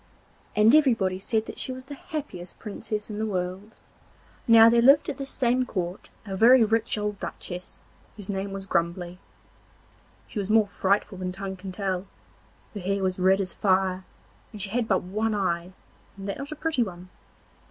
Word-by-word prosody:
Everybody 220 -5 +4
said 220 +3 -2
she - - -2
was 255 0 -8
the 285 - -8
happiest 275 - -7
Princess 210 0 -5
in 210 - -5
the 220 - 0
world. 190 +2 -4 0.7
Now 230 -1 +9
there 235 0 +5
lived 275 +6 +6
at 280 - -4
this 275 0 -4
same 250 -1 +1
court 185 -6 -4 0.2
a 195 -2 -4
very 235 +4 +7
rich 225 0 +1
old 210 -1 -3
duchess 180 0 -7 0.4
whose 205 -3 -7
name 195 0 -3
was 195 0 -5
Grumbly. 175 0 -1 1.1
She 215 - -5
was 195 0 -3
more 220 0 +5
frightful 195 0 0
than 185 -1 -3
tongue 190 +1 -5
can 190 0 -8
tell; 190 -1 -2 0.7
her 210 - -5
hair 195 +1 -1
was 185 0 -1
red 190 +2 +4
as 190 -2 -2
fire, 190 -1 +1 0.5
and 215 - -9
she 195 -1 -1
had 235 0 0
but 190 -3 +2
one 215 +4 -1
eye, 175 -3 -1 0.5
and 195 0 -7
that 200 - -4
not 275 +2 -6
a - - -4
pretty 305 -3 0
one! 180 -4 -4
200 Hz, 175 wpm, -26 LUFS, 185-225 Hz, 1.1 s, Now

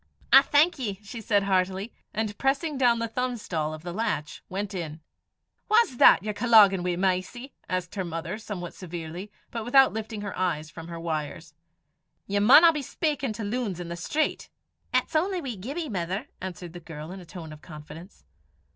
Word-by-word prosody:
"I 270 - +11
thank 300 +3 +3
ye," 205 -6 -3
she 225 +3 -8
said 205 -1 +2
heartily, 190 +2 0 0.2
and 215 -1 -2
pressing 285 +3 0
down 245 -3 +4
the 230 0 -1
thumbstall 225 -10 -2
of 155 0 -8
the 175 0 -5
latch, 180 -8 -2
went 200 +2 -4
in. 160 -4 -5 0.7
"Wha's 430 - +4
that 180 - +7
ye're 210 0 -2
colloguin' 205 -5 +6
wi', 180 0 -1
Mysie?" 190 +8 -1 0.2
asked 185 -1 -2
her 195 - -2
mother, 170 +3 -4
somewhat 185 -6 -6
severely, 175 +2 -7 0.2
but 230 -1 -4
without 265 +3 +5
lifting 220 -1 -5
her 200 -1 -5
eyes 160 -4 -1
from 165 0 -9
her 170 -1 -7
wires. 160 -1 -4 0.7
"Ye 200 +1 0
maunna 300 +11 +8
be 300 - -2
speykin' 285 -2 -2
to 215 - -6
loons 205 -4 -2
i' - - -3
the 170 0 -6
street." 295 - -1 0.4
"It's - - 0
only 365 +4 +1
wee 265 -8 -4
Gibbie, 280 - -5
mither," 185 -3 -3 0.2
answered 180 -2 -7
the 175 - -8
girl 160 -1 -9
in 190 - -7
a - - -10
tone 165 -2 -9
of 150 - -13
confidence. 155 +3 -11
195 Hz, 180 wpm, -27 LUFS, 175-240 Hz, 0.7 s, I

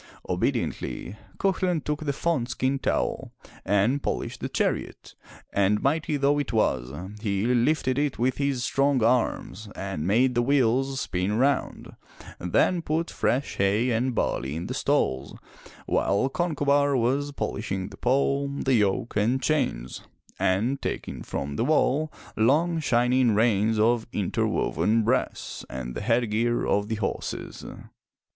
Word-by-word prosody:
Obediently, 100 - -2 0.2
Cuchulain 185 -3 +1
took 150 +1 -2
the 140 - +1
fawn 140 -4 -1
skin 130 +2 -1
towel - - -1 0.3
and 105 +8 +2
polished - - -3
the - - -4
chariot, - - -2 0.4
and 100 +1 +2
mighty 150 +2 +1
though 140 +1 +2
it 145 - -2
was, 65 - +1 0.3
he 100 -2 0
lifted 130 +2 +2
it 145 -2 0
with 125 +1 0
his 140 -3 0
strong 135 -2 +2
arms 115 -2 0
and 95 -5 -4
made 125 +6 +3
the 120 - +2
wheels 135 +1 +2
spin 95 +1 -1
round, 135 +2 0 0.4
then 170 - +2
put 165 +1 -1
fresh 135 +4 -1
hay 105 +6 +2
and 120 +2 0
barley 70 -7 -1
in 85 +2 -4
the - - -4
stalls 65 +1 0 0.5
while 100 +7 +1
Concobar 145 -4 +2
was 135 +5 0
polishing 100 -7 -3
the 100 - -12
pole, 140 +2 +1
the 140 -1 -1
yoke 105 +1 +1
and 115 +6 +2
chains, 65 - -1 0.4
and 115 +9 +1
taking - - -4
from 70 +1 -4
the - - +1
wall 155 0 +2 0.2
long 155 +9 +2
shining 125 -4 +2
reins 110 0 +2
of 115 +1 +2
interwoven 105 +2 0
brass 125 +4 -1
and 65 -1 -5
the - - -5
head 115 +1 +1
gear 120 +2 +1
of 100 0 +1
the 110 - -2
horses. 105 -2 -4
120 Hz, 140 wpm, -26 LUFS, 105-140 Hz, 0.5 s, made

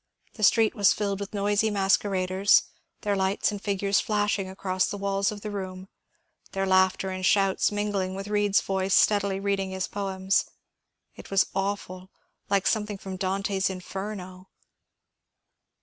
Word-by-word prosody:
The 220 - -11
street 220 +1 +4
was 205 -2 +4
filled 200 -2 -2
with 200 -1 -6
noisy 205 +2 +1
masqueraders, 195 -1 +2 0.4
their 205 -1 0
lights 190 +2 +1
and 205 -1 -6
figures 200 -1 +1
flashing 205 -2 0
across 190 -1 -1
the 205 - -4
walls 200 +1 0
of 205 -1 -8
the 210 - -5
room, 190 -1 -6 0.6
their 195 -1 0
laughter 190 0 +2
and 185 0 -5
shouts 195 +1 +3
min 205 0 -1
gling 190 -1 -1
with 195 +1 -6
Bead's 205 -1 +3
voice 190 0 0
steadily 200 -2 +3
reading 195 -1 -1
his 190 -1 -3
poems. 190 -1 0 0.7
It - - -12
was 195 -1 +3
awful, 195 -1 -3 0.4
like 200 -1 +2
something 210 -2 0
from 190 -1 -7
Dante's 195 +1 -1
Inferno." 190 0 -7
195 Hz, 150 wpm, -26 LUFS, 190-205 Hz, 0.7 s, street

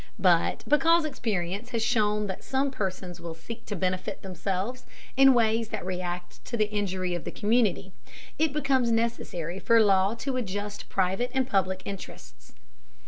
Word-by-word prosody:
But 180 -4 +3
because 325 +3 +4
experience 205 - -2
has 230 -2 -1
shown 210 -1 +2
that 190 -2 -5
some 270 +1 0
persons 185 -6 -4
will 170 -1 -6
seek 230 +8 -9
to 205 - -3
benefit 185 0 -2
themselves 195 +6 -3 0.3
in 270 0 +7
ways 225 -1 +2
that 215 -5 -4
react 180 -1 -5
to 240 - -3
the 215 -1 +1
injury 190 -3 -1
of 175 - -3
the - - -4
community, 210 -3 +1 0.5
it 315 -1 +3
becomes 275 -4 +2
necessary 195 -7 -1
for 230 +2 +4
law 200 0 +4
to 260 +2 -3
adjust 205 -2 -4
private 190 +6 0
and 260 -1 +2
public 190 -5 0
interests. - - -9
205 Hz, 155 wpm, -27 LUFS, 185-235 Hz, 0.5 s, in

